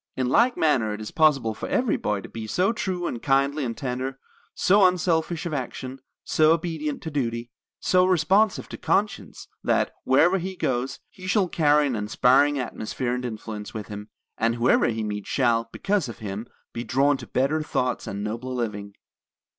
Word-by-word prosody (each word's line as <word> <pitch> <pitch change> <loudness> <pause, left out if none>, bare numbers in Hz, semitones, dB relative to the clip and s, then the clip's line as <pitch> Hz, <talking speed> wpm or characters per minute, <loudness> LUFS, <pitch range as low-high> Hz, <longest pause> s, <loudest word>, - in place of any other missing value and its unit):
In 130 -1 0
like 240 - +3
manner 120 -9 +2
it - - -9
is 110 - -6
possible 140 -8 +3
for - - -6
every 245 -4 +1
boy 105 -2 -1
to - - -9
be 110 -1 -7
so 185 - +1
true 185 -5 -3
and 120 - -3
kindly 140 +2 +2
and 115 -3 -3
tender, 130 -1 -3 0.4
so 200 +2 +4
unselfish 170 -2 0
of 170 - -3
action, 130 -1 -5 0.2
so 155 0 +4
obedient 160 -3 -3
to 160 - -5
duty, 120 -4 -2 0.3
so 185 0 +3
responsive 185 +4 +2
to - - -7
conscience, 195 - -1 0.2
that, - - +1
wherever 175 +8 +4
he 190 +2 -5
goes, 130 -5 -2
he 185 0 -10
shall 190 0 +2
carry 150 -3 +3
an 130 -4 -1
inspiring 130 +7 +3
atmosphere 120 0 -3
and 125 0 -3
influence 110 -2 -6
with 105 -3 -6
him; 105 0 -7 0.3
and 115 +1 +2
whoever 120 +1 +3
he 110 -1 -2
meets 105 -1 -4
shall, 115 -3 +1
because 195 -9 -1
of 115 - -8
him, 105 +2 -6 0.3
be 120 - -4
drawn 140 +4 +2
to - - -10
better 140 +5 +1
thoughts 125 -4 -2
and 100 +1 -4
nobler 120 +4 -4
living. 105 -4 -4
130 Hz, 180 wpm, -25 LUFS, 115-160 Hz, 0.4 s, so